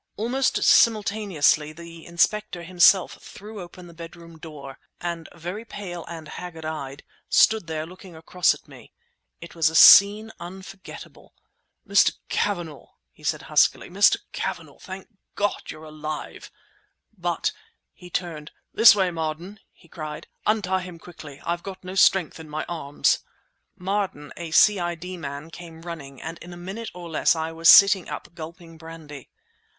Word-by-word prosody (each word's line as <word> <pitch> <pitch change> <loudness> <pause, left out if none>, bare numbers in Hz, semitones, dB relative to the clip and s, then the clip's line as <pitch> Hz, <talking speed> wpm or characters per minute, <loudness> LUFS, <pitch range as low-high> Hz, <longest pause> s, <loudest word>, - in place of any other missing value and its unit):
Almost 250 +5 0
simultaneously 200 -9 +3
the 165 0 -12
Inspector 175 +1 0
himself 180 +2 +4
threw 210 0 -10
open 175 +1 -11
the 170 - -13
bedroom 170 0 -12
door—and, 155 +3 -8
very 175 +6 -6
pale 180 -6 -8
and 165 -2 -8
haggard 165 0 -8
eyed, 140 -3 -6 0.3
stood 220 -6 +4
there 155 -1 -3
looking 185 +1 -13
across 170 +3 +1
at - - -19
me. - - -15 0.5
It 170 - -10
was 160 -2 +2
a 160 - -7
scene 205 +5 +8
unforgettable. 190 +2 -11 0.5
"Mr. - - +4 0.2
Cavanagh!" 175 -8 -2 0.2
he - - -22
said - - -1
huskily—"Mr. - - +3
Cavanagh! - - -5
Thank 190 0 -9 0.3
God 205 0 -1
you're 155 0 -8
alive! 155 -1 -7 0.7
But"—he 180 - -5
turned—"this 175 +7 +3
way, 190 -3 +1
Marden!" 165 +5 -5
he 170 - -23
cried, 155 -2 -7 0.2
"Untie 190 -3 +1
him 180 -2 -9
quickly! 155 -4 -12
I've 170 0 -2
got 190 0 -9
no 185 0 -7
strength 190 -4 +3
in 160 -1 -11
my 155 +1 -4
arms!" 155 -4 0 0.6
Marden, 190 -6 -3
a 170 -1 -7
C.I.D. 180 -1 +2
man, 145 0 -7
came 165 -1 -11
running, 145 -6 -8
and 165 +1 -7
in 175 +1 -11
a - - -10
minute, 195 +6 -7
or 175 -1 -8
less, 160 +1 +2
I 160 0 -3
was 165 +1 +3
sitting 195 -2 +7
up 175 - -8
gulping 165 0 -11
brandy. 160 -4 -11
170 Hz, 140 wpm, -24 LUFS, 160-190 Hz, 0.7 s, scene